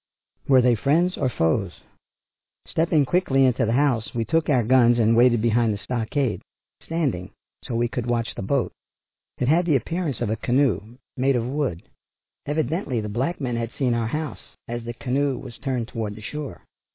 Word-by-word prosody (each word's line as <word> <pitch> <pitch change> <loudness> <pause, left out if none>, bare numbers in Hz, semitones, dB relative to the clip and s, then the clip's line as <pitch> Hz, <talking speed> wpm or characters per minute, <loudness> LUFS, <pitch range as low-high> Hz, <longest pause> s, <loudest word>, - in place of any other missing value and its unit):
Were 130 -2 +6
they 125 -1 +5
friends 160 - +2
or 130 - 0
foes? 85 -1 -1 0.8
Stepping 160 -3 +2
quickly 135 -5 +3
into 125 -2 +2
the 115 - +1
house 125 -5 +1
we 115 -1 0
took 165 +3 +1
our 130 -5 +3
guns 120 0 +5
and 115 0 +3
waited 120 -2 +4
behind 115 -1 +3
the 105 - -2
stockade, 120 +3 -2 0.4
standing 140 - -2 0.3
so 120 - -4
we 120 +1 +2
could 120 0 -4
watch 120 -1 -1
the - - -6
boat. 125 +6 0 0.7
It 125 - -1
had 170 +5 +3
the 155 - +4
appearance 165 +1 -2
of 120 -3 -1
a - - +1
canoe, 120 -3 0 0.2
made 135 +1 +2
of 120 -1 0
wood. 130 - -2 0.6
Evidently 150 - -1
the 105 -1 -4
black 130 +12 -2
men 125 -4 -2
had 115 -1 -2
seen 130 -4 +1
our 115 -1 0
house 150 0 -4 0.3
as 120 0 -5
the 120 - -4
canoe 135 +2 0
was 125 -3 -10
turned 125 -4 -2
toward 110 -3 -4
the 110 - -11
shore. 150 +5 -6
125 Hz, 185 wpm, -24 LUFS, 115-140 Hz, 0.8 s, Were